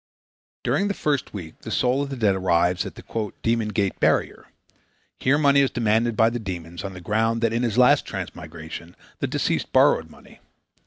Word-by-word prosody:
During 200 - +1
the 200 - -2
first 145 -4 -1
week 85 -6 -8
the - - -8
soul 125 +2 +1
of 140 - -3
the 135 - -4
dead 110 -5 +2
arrives 90 -1 +1
at - - -10
the - - -11 0.4
"Demon 115 -1 +1
Gate 100 -3 -1
Barrier." - - +1 0.7
Here 140 +3 +3
money 140 -2 +4
is 135 -1 +4
demanded 115 -1 +1
by 115 +1 +4
the 120 - -3
demons 85 -5 -6
on 95 -1 -5
the 90 - -9
ground 110 +4 0
that 115 -1 +1
in 115 - 0
his 120 -2 -1
last 125 0 +5
transmigration 80 +2 -8 0.2
the - - -1
deceased - - -1
borrowed - - +4
money. - - -17
115 Hz, 190 wpm, -24 LUFS, 95-125 Hz, 0.7 s, last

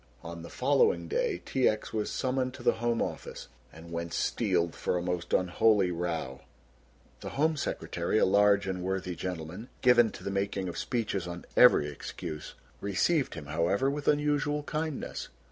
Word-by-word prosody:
On - - -7
the - - -9
following 470 -1 +2
day 485 -4 -1
T. 130 - +3
X. 110 0 -4
was 105 -1 -1
summoned 130 -1 -1
to - - -10
the - - +2
Home 120 -1 +1
Office - - -6 0.2
and 80 +2 -12
went 85 0 -4
steeled 85 -1 +1
for 90 - -1
a - - -1
most 90 -1 -3
unholy 95 +1 +3
row. 85 -6 -3 0.8
The - - -7
Home 155 +2 +3
Secretary, 85 - -2
a - - +5
large 100 +1 +4
and 95 -1 -3
worthy 95 -1 -2
gentleman, 90 +5 -5
given 125 -2 +6
to - - -10
the 100 - -3
making 100 -1 -1
of 85 - -5
speeches 105 -7 -2
on 85 0 -7
every 125 -12 +7
excuse, 75 +2 -7 0.2
received 130 - +1
him, 80 -3 -7
however, 85 - +1
with 145 0 -5
unusual 150 0 +1
kindness. 155 -1 -4
100 Hz, 165 wpm, -29 LUFS, 85-130 Hz, 0.8 s, every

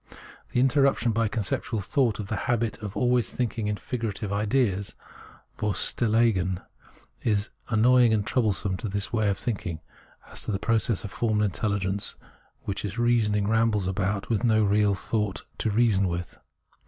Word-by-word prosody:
The - - +1
interruption 135 -2 +3
by 115 0 +1
conceptual 110 +1 -2
thought 115 +3 +1
of 105 - -3
the 110 - -3
habit 115 -2 0
of 105 -2 -6
always 125 -2 +2
thinking 115 -3 -2
in 105 - 0
figurative 110 -3 -4
ideas 105 -2 0 0.6
Preface 105 -3 +1
57 115 -3 0
{Vorstellungen) 95 -6 +1 0.6
is 105 -3 +2
as 105 - -5 0.2
annoying 120 +1 +5
and 105 -2 +1
troublesome 105 -6 0
to 110 - -4
this 100 +2 -3
way 110 -3 +2
of 100 - 0
thinking 100 -8 -3 0.5
as - - -5
to - - -3
that 100 - -1
process 115 -2 +1
of 100 - -6
formal 110 -2 +1
intelligence 100 -1 -1 0.5
which 100 - -3
in 105 - -2
its 105 - -9
reasoning 110 -4 +2
rambles 110 -3 +2
about 100 +1 -1
with 115 -1 0
no 110 -2 +4
real 105 0 +3
thoughts 105 0 -2 0.2
to 110 - 0
reason 105 -3 +3
with. 85 0 -4
105 Hz, 165 wpm, -26 LUFS, 100-115 Hz, 0.6 s, annoying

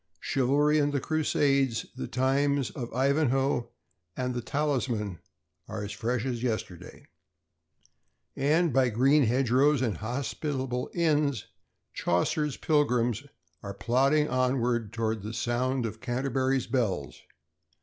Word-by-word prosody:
Chivalry 145 +3 +2
and 145 0 +2
the 140 - 0
Crusades, 140 -5 +1
the - - -5
times 135 +2 +1
of 120 -2 -6
Ivanhoe 135 -1 +1 0.5
and 125 0 -1
The 120 - -3
Talisman, 120 - -1 0.5
are 105 - -5
as 105 - -5
fresh 115 +4 -2
as 120 -3 -2
yesterday. 110 -8 -4 1.3
And 155 +3 +2
by 130 -1 +3
green 135 +5 +4
hedgerows 130 +3 +3
and 115 -5 -1
hospitable 130 +2 -3
inns, 150 - +1 0.5
Chaucer's 140 - 0
Pilgrims 125 -4 +1 0.3
are 100 -1 -7
plodding 135 +7 +2
onward 125 -4 0
toward 115 -2 -2
the 110 +3 -6
sound 125 +2 0
of 110 0 -6
Canterbury's 130 +1 0
bells. 95 - -2
130 Hz, 115 wpm, -28 LUFS, 115-140 Hz, 1.3 s, green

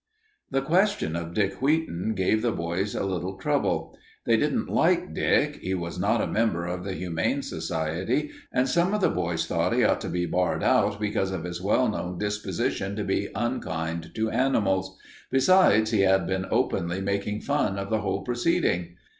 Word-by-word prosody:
The 135 0 0
question 180 - +1
of 85 0 -5
Dick 100 0 0
Wheaton 135 - 0
gave 100 +3 +2
the 120 0 +1
boys 90 +3 -2
a - - -1
little 95 0 -3
trouble. 95 - -1 0.3
They - - +4
didn't - - 0
like - - +2
Dick, - - +2
he 95 +1 -3
was 85 0 -5
not 105 +4 +2
a - - +1
member 105 -7 0
of 90 0 -4
the 95 0 -4
Humane 85 -1 -1
Society, 95 - -2 0.2
and 125 +1 +2
some 175 +6 +2
of 210 - -1
the - - +3
boys 80 -1 -1
thought - - 0
he - - +3
ought - - +2
to - - -4
be 90 0 -1
barred 90 +1 0
out 100 0 +2
because 105 -2 0
of 95 -4 -4
his 90 0 -5
well 105 +6 +2
known 90 -4 -3
disposition 100 -1 -2
to 105 - -2
be 100 +1 -1
unkind 80 -8 -3
to 110 0 0
animals. 95 -7 +1 0.3
Besides, 130 - +4
he 110 - +2
had 95 -2 +4
been 95 +1 -2
openly 85 +2 0
making 100 +2 -2
fun 140 -9 0
of 100 +1 -4
the 110 -1 +1
whole 95 -1 -2
proceeding. 110 - 0
95 Hz, 180 wpm, -26 LUFS, 90-110 Hz, 0.3 s, They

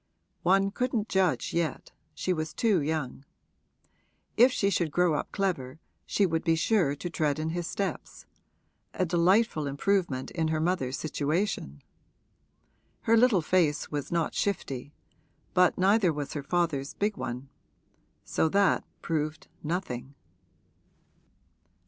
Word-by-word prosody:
One 195 +2 +3
couldn't 235 -2 -1
judge 190 -3 +1
yet 170 -2 -2 0.2
she 185 - 0
was 155 -2 -4
too 210 -8 +2
young. 145 -3 -3 1.1
If 245 +3 +6
she 200 -4 +1
should 170 -4 +1
grow 175 +2 +2
up 150 - -2
clever 160 -9 -2 0.3
she 205 - +2
would 165 -3 -1
be 165 -2 +3
sure 160 -4 +2
to 160 - -5
tread 155 -4 0
in 155 +1 -2
his 175 0 -3
steps 200 -1 -4 0.7
a 185 - +1
delightful 175 -1 +2
improvement 140 -2 0
in 165 -2 -1
her 160 0 0
mother's 155 -6 0
situation! 150 - -2 1.2
Her 225 - +3
little 225 -7 +4
face 155 -4 +1
was 145 -2 -4
not 170 -2 0
shifty, 145 -9 -2 0.6
but 180 -1 +4
neither 195 -1 +4
was 145 -2 -4
her 145 - -3
father's 145 -3 -1
big 205 0 0
one: 130 +1 -5 0.7
so 160 - +1
that 200 +2 +3 0.2
proved 155 -1 -2
nothing. 145 -5 -4
165 Hz, 130 wpm, -28 LUFS, 150-195 Hz, 1.2 s, If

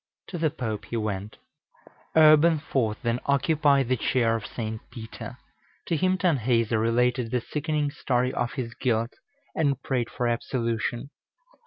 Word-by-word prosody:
To 175 - -5
the 160 -1 +2
Pope 110 -6 -4
he 120 - -4
went. 105 -1 -3 0.8
Urban 155 +1 +7
IV. 130 -8 -1
then 120 0 0
occupied 140 -1 +3
the 130 - +2
chair 115 -1 +1
of 110 -2 -4
St. 110 -2 -5
Peter. 110 -2 -8 0.5
To 170 - 0
him 185 +3 +2
Tanhäuser 120 - +2
related 120 +1 +1
the 125 - 0
sickening 150 +3 -2
story 125 -1 0
of 120 - -2
his 120 -4 -4
guilt, 115 -2 0 0.4
and 140 -4 +1
prayed 125 -3 -1
for 120 - -2
absolution. 120 +1 -2
125 Hz, 145 wpm, -26 LUFS, 115-145 Hz, 0.8 s, Urban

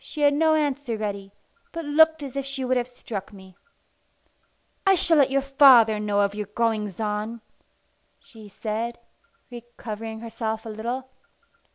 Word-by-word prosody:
She 300 +2 -7
had 290 0 +5
no 315 +2 +3
answer 285 -6 -1
ready, 200 -2 -5 0.4
but 330 -1 -6
looked 320 +1 +4
as 275 -2 -7
if 275 - -2
she 270 -1 -4
would 255 0 +1
have 245 -1 0
struck 220 -5 -7
me. 190 -2 -15 1.3
"I 390 -1 +5
shall 330 -2 +2
let 280 -2 +5
your 275 0 +1
father 260 -6 +6
know 205 -1 +1
of 200 0 +1
your 210 -1 -5
goings 210 -3 -1
on," 215 +2 -3 0.8
she 220 -4 -14
said, 225 +3 -4 0.5
recovering 225 -2 -8
herself 220 -1 -4
a - - -6
little. 235 +4 -4
235 Hz, 155 wpm, -24 LUFS, 215-275 Hz, 1.3 s, father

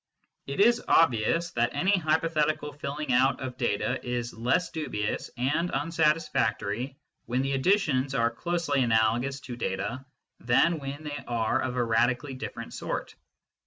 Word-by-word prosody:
It 140 - -4
is 235 +4 +5
obvious 165 +4 +3
that 120 +1 0
any 190 +2 +2
hypo 160 -2 +1
thetical 150 -2 0
filling 145 -1 -3
out 130 +2 +3
of 130 -1 -5
data 100 - -1
is 120 -1 -3
less 125 +10 0
dubious 105 -10 -3
and 150 +8 0
unsatis 165 -1 +1
factory 115 +5 -1 0.3
when 125 +2 0
the 135 - -1
additions 135 -3 +2
are 115 -1 +2
closely 170 -5 -1
analogous 120 +3 +2
to 125 - -7
data 120 +3 -3 0.4
than 155 +7 +3
when 140 +2 -6
they 145 -1 -5
are 115 -2 0
of 125 -1 -2
a 125 - +1
radically 120 +4 +1
different 130 - -7
sort. - - -4
135 Hz, 150 wpm, -28 LUFS, 120-155 Hz, 0.4 s, is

